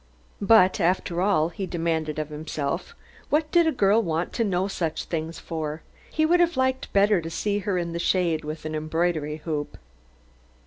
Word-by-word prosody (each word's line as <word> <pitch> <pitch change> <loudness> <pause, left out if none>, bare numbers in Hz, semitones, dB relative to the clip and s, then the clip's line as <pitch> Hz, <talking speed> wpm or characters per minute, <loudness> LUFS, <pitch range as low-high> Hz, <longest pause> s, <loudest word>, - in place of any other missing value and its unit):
But, 200 -2 +5
after 175 -1 +1
all, 185 -5 +2
he 190 +3 -5
demanded 160 -3 -1
of 155 -1 -3
himself, 150 - -4 0.3
what 300 +1 +1
did 340 -2 +4
a - - +3
girl 215 -4 +3
want 170 -3 -2
to 230 - 0
know 190 -2 0
such 170 -5 -2
things 165 0 -4
for? 155 -2 -5 0.3
He 315 - +1
would 350 +3 +4
have 345 -4 +2
liked 260 0 0
better 200 -2 +4
to 165 - -6
see 205 +5 -1
her 195 -2 -1
in 170 -1 -2
the 170 - -3
shade 170 -3 +1
with 155 +1 -6
an 155 - -4
embroidery 155 -1 -1
hoop. 150 -3 -3
175 Hz, 180 wpm, -25 LUFS, 155-205 Hz, 0.3 s, But